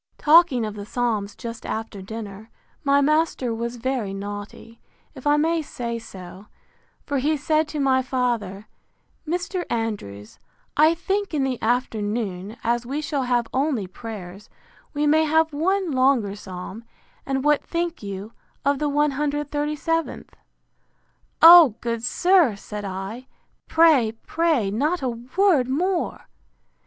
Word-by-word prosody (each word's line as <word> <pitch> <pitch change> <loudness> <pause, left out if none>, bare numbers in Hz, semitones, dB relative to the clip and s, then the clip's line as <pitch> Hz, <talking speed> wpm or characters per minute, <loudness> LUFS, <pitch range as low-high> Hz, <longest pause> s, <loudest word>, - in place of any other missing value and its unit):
Talking 305 -6 +5
of 215 - -5
the 205 -1 -7
Psalms 210 -3 -2
just 230 -2 -7
after 220 -2 -5
dinner, 215 +1 -8 0.3
my 280 -1 +4
master 305 -4 +1
was 235 +1 -4
very 240 -5 -2
naughty, 205 +3 -8 0.3
if - - -7
I 295 0 +4
may 325 +2 +1
so 235 -5 -5
say: 185 -3 -11 0.6
For 285 -3 -1
he 300 +4 +1
said 310 +2 +1
to 305 -1 -5
my 265 -2 +3
father, 240 -6 -2 0.6
Mr. 355 +2 -2
Andrews, 200 - -4 0.4
I 310 +3 +5
think 390 +1 -2
in 280 - +1
the 260 -2 -2
afternoon, 220 -4 -2
as 235 +1 0
we 270 +5 -3
shall 295 -2 -2
have 245 -1 +1
only 265 -6 0
prayers, 195 -1 -9 0.5
we 295 +1 +1
may 310 +2 +4
have 320 0 +2
one 370 +4 0
longer 255 -6 +2
psalm; 190 +2 -8 0.4
and 270 -1 -2
what 295 0 +3
think 340 0 -3
you 200 +1 -7 0.3
of 280 -1 +2
the 295 - 0
cxxxviith? 295 +2 -1 1.1
O, 330 -8 +10
good 230 -1 -3
sir! 350 - +3
said 210 +1 -7
I, 195 +7 -6 0.4
pray, 305 -9 +4
pray, 315 -12 +1
not 295 - 0
a 255 - +1
word 255 +5 +1
more! 350 +6 -1
255 Hz, 135 wpm, -23 LUFS, 220-305 Hz, 1.1 s, O